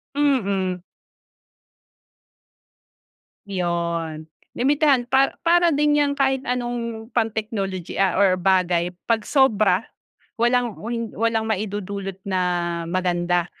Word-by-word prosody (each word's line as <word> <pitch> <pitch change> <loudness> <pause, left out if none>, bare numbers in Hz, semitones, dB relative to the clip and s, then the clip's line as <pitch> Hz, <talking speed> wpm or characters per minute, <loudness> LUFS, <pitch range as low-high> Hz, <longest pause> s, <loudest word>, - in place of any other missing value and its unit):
Mm. 200 -11 +1 2.7
'Yon 170 -3 -2 0.2
limitahan 275 -1 +2
pa 270 +1 +3 0.2
para 345 0 +5
din 295 0 +2
'yan 290 -1 +2
kahit 270 -1 +1
anong 240 -2 -3
pan-technology 210 -5 -2
ah 195 -1 +2
or 190 -2 +4
bagay 180 -1 +1 0.2
'pag 225 -2 +1
sobra 215 -8 +2 0.5
walang 240 -2 +1
o - - -9
hi 230 -2 -3
walang 225 0 0
maidudulot 200 -2 -3
na 190 -2 -1 0.5
maganda. 175 -1 0
215 Hz, 95 wpm, -22 LUFS, 185-245 Hz, 2.7 s, para